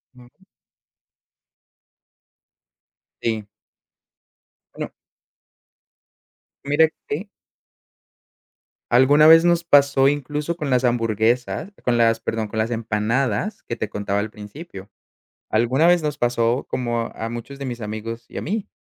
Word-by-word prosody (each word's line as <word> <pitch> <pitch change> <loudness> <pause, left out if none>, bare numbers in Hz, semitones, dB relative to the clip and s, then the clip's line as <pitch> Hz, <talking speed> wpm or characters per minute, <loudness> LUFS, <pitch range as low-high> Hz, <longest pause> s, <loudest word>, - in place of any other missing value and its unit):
Ujú. 125 +10 -20 2.8
Sí. 110 -3 -2 1.3
Bueno. - - -6 1.7
Mira 145 +3 +4 0.2
que 185 +8 -4 1.6
Alguna 145 +5 +6
vez 165 +1 +8
nos 170 -1 +3
pasó 140 -3 +4
incluso 145 +3 -2
con 150 -4 -3
las 125 0 +2
hamburguesas 120 - 0
con 120 -1 +1
las, 115 -1 +3
perdón, 110 -1 -3
con 110 - -7
las 110 +2 0
empanadas, 115 - -1
que 115 - -3
te 110 - -3
contaba 100 -1 -3
al 105 +1 -3
principio, 105 - -10 0.6
alguna 125 +8 +2
vez 175 -2 +4
nos 150 -1 -2
pasó 120 +1 +1
como 120 -2 -2
a 115 +1 -5
muchos 120 +4 -7
de 140 - -6
mis 120 -2 -5
amigos 110 +2 -6
y - - -12
a - - -3
mí, 205 +4 -3
120 Hz, 120 wpm, -22 LUFS, 115-145 Hz, 2.8 s, vez